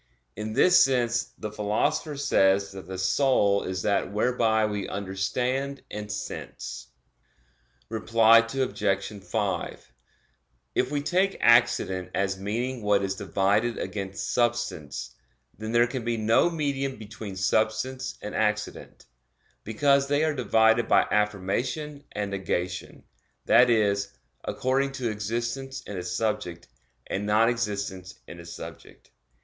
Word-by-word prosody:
In 105 +1 -4
this 180 +9 +6
sense 120 -3 +1
the 105 -1 -5
Philosopher 125 +9 -1
says 100 -7 +3
that 95 -3 -10
"the 95 0 -6
soul 100 0 +3
is 95 0 -4
that 100 -2 +1
whereby 110 0 +2
we 105 -2 -3
understand 125 +8 -2
and 105 0 -5
sense." 100 - -6 1.0
Reply 115 0 +5
Obj. 115 -5 -1
5: 95 -8 -3 0.8
If 125 - +1
we 145 0 -1
take 185 +5 +1
accident 115 -6 +3
as 95 -1 0
meaning 120 +5 -2
what 105 -1 +2
is 95 0 -1
divided 100 +4 0
against 95 -1 -4
substance, 120 - -1 0.4
then 110 +1 -6
there 120 0 +5
can 120 0 -4
be 115 0 -1
no 110 +9 +3
medium 140 -4 -2
between 105 -2 -8
substance 110 +5 0
and 105 - -5
accident; 105 -1 -2 0.6
because 140 +5 +2
they 145 +2 +2
are 155 -1 +1
divided 115 -3 +3
by - - +5
affirmation 120 +9 -1
and 105 -1 -3
negation, 90 -2 -3 0.4
that 125 0 +6
is, 100 -3 +2 0.4
according 135 +2 0
to 125 -4 -2
existence 120 +6 -3
in 100 - -8
a 90 - -3
subject, 90 -1 -3 0.4
and 100 +2 -3
non 110 +2 +4
existence 100 -5 -3
in 85 - -10
a 85 - -10
subject. 85 - -11
110 Hz, 125 wpm, -26 LUFS, 100-125 Hz, 1.0 s, this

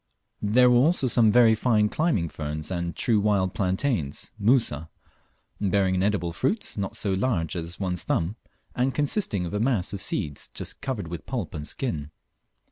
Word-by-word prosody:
There 115 +5 +4
were 125 0 +5
also 145 +3 +3
some 115 -3 +4
very 115 -1 +6
fine 110 -2 +2
climbing 150 - 0
ferns 75 +1 -5
and 85 -1 -3
true 110 -3 +2
wild 100 -3 +1
Plantains 95 - -1
(Musa), 100 - +2 0.7
bearing 95 -1 +2
an 90 - +1
edible 95 -4 0
fruit 135 - -1
not 100 -2 -3
so 100 - 0
large 95 -6 0
as 85 0 -5
one's 90 -3 -2
thumb, 85 +5 0 0.4
and 125 +1 0
consisting 145 - 0
of 85 - -5
a 105 - 0
mass 110 -6 +1
of 100 - -4
seeds 70 -5 -3
just - - -5
covered 130 -10 -3
with 85 -1 -7
pulp 120 -9 -3
and 75 -1 -5
skin. 80 - -3
100 Hz, 170 wpm, -26 LUFS, 85-120 Hz, 0.7 s, very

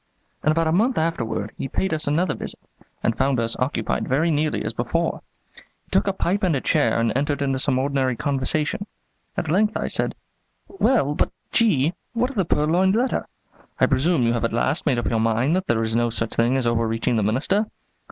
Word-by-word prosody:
In 155 - +3
about 165 +1 +1
a 160 - +1
month 225 +9 +2
afterward 115 -10 -1
he - - -2
paid 190 +6 -1
us 155 -1 -3
another 165 +6 +1
visit, - - -5 0.4
and 115 - +1
found 135 -2 +1
us 115 0 0
occupied 125 -4 -1
very 155 +6 +2
nearly 155 0 0
as - - -2
before. - - -1 0.3
He - - -23
took - - +2
a - - +3
pipe 195 +4 0
and 180 -6 +2
a - - +1
chair 115 -2 +2
and 115 -1 +1
entered 145 +2 0
into 135 -2 0
some 130 -1 +1
ordinary 135 -1 0
conversation. 150 - -1 0.5
At 160 - -1
length 210 +5 +2
I - - -2
said: - - -1 0.5
"Well, 240 - +1
but, - - +1 0.2
G, 170 - +3 0.2
what 245 +3 0
of - - -13
the 195 -4 +1
purloined 175 +6 +2
letter? 250 +3 0 0.5
I - - +6
presume 140 +1 +2
you 115 0 +2
have 120 - -1
at 115 - 0
last 130 +7 0
made 125 - +3
up 120 - -1
your 115 - +1
mind 115 +7 +2
that 190 +1 -1
there 115 -1 +1
is 110 0 -1
no 120 0 +2
such 115 0 -2
thing 120 +3 +2
as 130 - -1
overreaching 115 0 0
the 110 - +2
Minister?" 140 - +1
140 Hz, 210 wpm, -23 LUFS, 120-170 Hz, 0.5 s, I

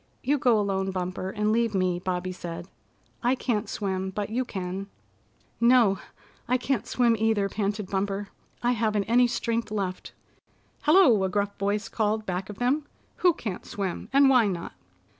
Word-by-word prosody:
"You 285 +3 +2
go 240 -4 +4
alone, 195 -1 0
Bumper, 185 0 -3
and 210 +2 0
leave 230 -1 +1
me," 185 -2 +1
Bobby 180 0 -2
said. 170 -1 -7 0.5
"I 245 +2 +2
can't 220 -5 -1
swim, 190 -3 -2
but 205 +2 -4
you 250 +3 0
can." 190 -3 -5 0.7
"No, 235 -5 +5 0.5
I 250 - +3
can't 255 -2 -1
swim 240 -2 +3
either," 220 -2 +2
panted 205 0 -2
Bumper. 195 +1 -2 0.3
"I 240 - +3
haven't 215 -3 +1
any 245 +4 +4
strength 235 -1 -1
left." 195 -3 -4 0.7
"Hello!" 295 - +5
a 190 - +1
gruff 200 +1 -1
voice 200 +1 0
called 215 0 -1
back 185 +1 -3
of 210 - -8
them. 280 +5 0 0.3
"Who 355 -3 +4
can't 205 -6 -5
swim, 195 -3 -4
and 275 +1 +6
why 250 -5 +5
not?" 175 -4 -4
210 Hz, 160 wpm, -26 LUFS, 190-235 Hz, 0.7 s, and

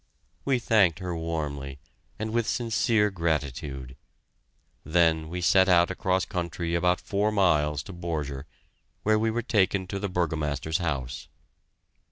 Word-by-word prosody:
We 135 -2 +2
thanked 105 -8 +3
her 90 -2 -4
warmly, 75 -4 -4 0.4
and 110 +1 -3
with 120 -1 +1
sincere 115 -2 +1
gratitude. 70 -6 -3 0.9
Then 80 -1 +2
we 90 +2 -4
set 95 +2 +4
out 85 0 +5
across 95 0 0
country 85 -3 -3
about 90 +1 +2
four 105 +2 0
miles 75 -8 +2
to 95 - -9
Borger, 75 -5 -4 0.6
where 110 0 +3
we 110 +1 +1
were 115 +1 -1
taken 100 -4 +1
to 100 +2 -4
the 100 0 -3
Burgomaster's 80 -3 -1
house. 65 -8 -3
85 Hz, 135 wpm, -27 LUFS, 75-100 Hz, 0.9 s, out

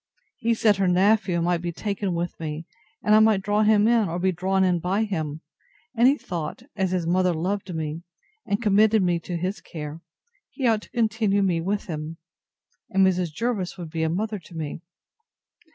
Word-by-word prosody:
He 230 0 +1
said 215 -2 +3
her 195 -1 +2
nephew 185 -1 +3
might 175 -1 +1
be 175 -1 -3
taken 200 0 -3
with 170 +1 -2
me, 155 0 -5 0.4
and 210 - +3
I 215 - +8
might 220 -3 +4
draw 205 +1 +1
him 215 0 +4
in, 230 -5 +3
or 170 - -3
be 185 +1 +1
drawn 190 +2 +1
in 180 -2 +2
by 190 +6 0
him; 160 -7 -3 0.5
and 235 +2 +5
he 280 +2 +4
thought, 170 - -5
as 190 -3 0
his 180 -2 -1
mother 180 +1 +2
loved 190 +4 -2
me, 160 0 -4 0.4
and 200 - -1
committed 215 -1 +4
me 175 -1 +1
to 175 +1 -5
his 185 +4 -3
care, 155 0 -7 0.5
he 270 - -4
ought 225 -3 +3
to - - -15
continue 220 -3 +1
me 175 -4 +1
with 200 +4 -2
him; 155 -1 -5 0.7
and 190 0 +4
Mrs. 180 -3 +1
Jervis 205 0 -2
would 170 -3 -7
be 165 -1 -3
a 160 - +1
mother 210 +5 -2
to 175 0 -15
me. 160 0 -5
185 Hz, 195 wpm, -24 LUFS, 170-210 Hz, 0.7 s, I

